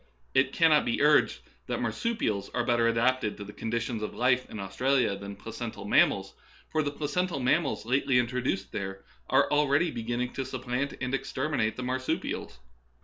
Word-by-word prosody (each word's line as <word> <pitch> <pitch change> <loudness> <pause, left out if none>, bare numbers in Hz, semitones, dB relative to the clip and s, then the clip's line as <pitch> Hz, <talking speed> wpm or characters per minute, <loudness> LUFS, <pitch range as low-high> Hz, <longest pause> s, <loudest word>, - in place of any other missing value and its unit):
It - - +3
cannot - - +4
be - - -1
urged - - +4 0.3
that - - -2
marsupials 110 - -1
are 120 - +1
better 120 -1 +3
adapted 115 -1 +1
to 105 - -6
the 105 +1 -10
conditions 115 +1 -2
of 105 - -4
life 125 +1 +2
in 110 - -7
Australia 110 +4 +1
than 100 0 -7
placental 100 - -7
mammals; - - +3 0.4
for 155 - +2
the 145 - -1
placental 150 +3 -2
mammals 135 +2 +1
lately 130 +1 +2
in 125 - +4
troduced 120 -6 -2
there 95 0 -5 0.2
are - - +4
already 150 +3 +3
beginning 120 +1 -3
to 135 - -2
supplant 130 +1 -3
and 125 0 -3
exterminate 135 -3 -1
the 125 - -5
marsupials. 130 - -2
125 Hz, 165 wpm, -28 LUFS, 110-135 Hz, 0.4 s, cannot